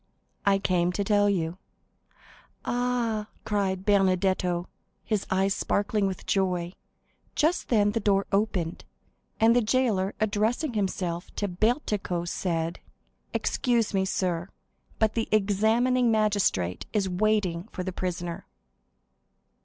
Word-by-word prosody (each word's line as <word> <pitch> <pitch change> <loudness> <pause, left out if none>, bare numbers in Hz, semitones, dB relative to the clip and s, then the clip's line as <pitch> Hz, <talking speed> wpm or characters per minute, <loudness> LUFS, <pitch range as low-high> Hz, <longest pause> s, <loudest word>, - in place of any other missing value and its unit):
"I 195 -1 +5
came 180 -3 +1
to 200 - -1
tell 205 0 +3
you." 175 -2 -1 1.1
"Ah," 240 -3 0 0.2
cried 195 -3 -1
Benedetto, 185 -3 +2 0.4
his 215 -3 -1
eyes 190 +1 +2
sparkling 205 0 0
with 190 -2 -5
joy. 180 -2 0 0.6
Just 320 +4 +1
then 205 -3 +3
the 230 - -1
door 200 -2 +2
opened, 195 -5 0 0.6
and 230 +1 +5
the 245 - +5
jailer, 215 -5 +1
addressing 220 +7 0
himself 185 -4 -2
to 205 - -1
Bertuccio, 200 - 0
said: 170 -1 -2 0.5
"Excuse 235 -5 0
me, 190 -1 +2
sir, 180 -2 -1 0.5
but 220 -1 +2
the 225 - -1
examining 220 +5 +3
magistrate 205 - +1
is 205 -3 +1
waiting 190 -2 0
for 185 - -4
the 185 0 -4
prisoner." 175 -2 -4
200 Hz, 115 wpm, -27 LUFS, 180-215 Hz, 1.1 s, I